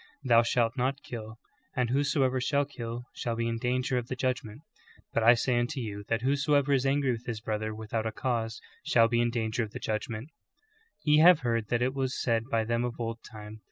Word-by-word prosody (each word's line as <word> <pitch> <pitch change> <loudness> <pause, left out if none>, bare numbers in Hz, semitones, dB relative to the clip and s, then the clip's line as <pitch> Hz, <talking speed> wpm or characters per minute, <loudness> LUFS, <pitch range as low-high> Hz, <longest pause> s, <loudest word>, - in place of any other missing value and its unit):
Thou 120 -3 +6
shalt 115 0 +1
not 135 +2 -1
kill; 110 -2 -7 0.4
and 125 -2 0
whosoever 135 -2 +1
shall 140 +3 +1
kill 120 -3 -6
shall 115 -1 -3
be 115 0 -1
in 115 0 -2
danger 125 +1 0
of 120 - -7
the 130 - -3
judgment: 125 -1 -2 0.5
But 115 - +2
I 115 +2 +7
say 120 +1 +1
unto 125 +4 -2
you 105 -4 -5
tliat 115 0 0
whosoever 140 +1 +2
is 135 0 +2
angry 135 -1 +2
with 120 0 -5
his 115 -3 -3
brother 110 0 -3
without 110 +1 -3
a - - -2
cause 115 -1 -2 0.2
shall 115 -1 +4
be 120 +1 +1
in 120 - +2
danger 115 0 -1
of 110 -2 -4
the - - -5
judg 110 +1 -2
ment: 115 +5 -6
=^ - - -41 0.7
Ye 150 0 +5
have 170 0 +7
heard 115 -3 0
that 120 +1 +1
it 130 +1 0
was 135 -1 -2
said 115 -2 +1
by 115 -1 +1
them 115 +2 0
of 125 -1 -4
old 115 0 -3
time. 105 0 -9
120 Hz, 225 wpm, -29 LUFS, 115-130 Hz, 0.7 s, I